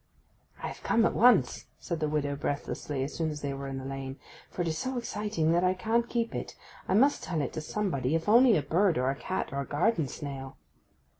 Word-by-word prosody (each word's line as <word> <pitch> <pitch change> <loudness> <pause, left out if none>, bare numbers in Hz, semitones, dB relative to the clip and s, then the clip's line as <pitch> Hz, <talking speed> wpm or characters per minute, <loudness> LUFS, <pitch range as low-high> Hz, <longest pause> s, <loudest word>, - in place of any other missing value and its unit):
'I - - -2
am - - -7
come 225 0 +3
at - - +2
once,' 215 - +4
said 170 -2 -4
the 155 -1 0
widow 145 -2 -1
breathlessly, 140 -1 -3
as 140 - -4
soon 160 -1 -1
as 150 -1 -6
they 140 -1 -2
were 135 0 -5
in 135 0 -4
the 130 - -6
lane, 135 0 -5 0.3
'for 175 - -3
it - - -2
is 160 - -1
so 260 0 -2
exciting 210 -8 -1
that 175 +1 +3
I 185 0 +3
can't 230 +4 0
keep 235 -1 -1
it. - - -5 0.3
I 185 - +2
must 275 +7 +4
tell 165 -3 -2
it 140 - -2
to 155 - -3
somebody, 155 -6 -1
if 165 0 -2
only 235 +1 +6
a 150 - -1
bird, 175 +5 +2
or 130 +1 +2
a - - -4
cat, 170 +1 -3
or 140 - -1
a - - -4
garden 165 0 +1
snail. 135 0 -7
160 Hz, 235 wpm, -29 LUFS, 140-210 Hz, 0.3 s, only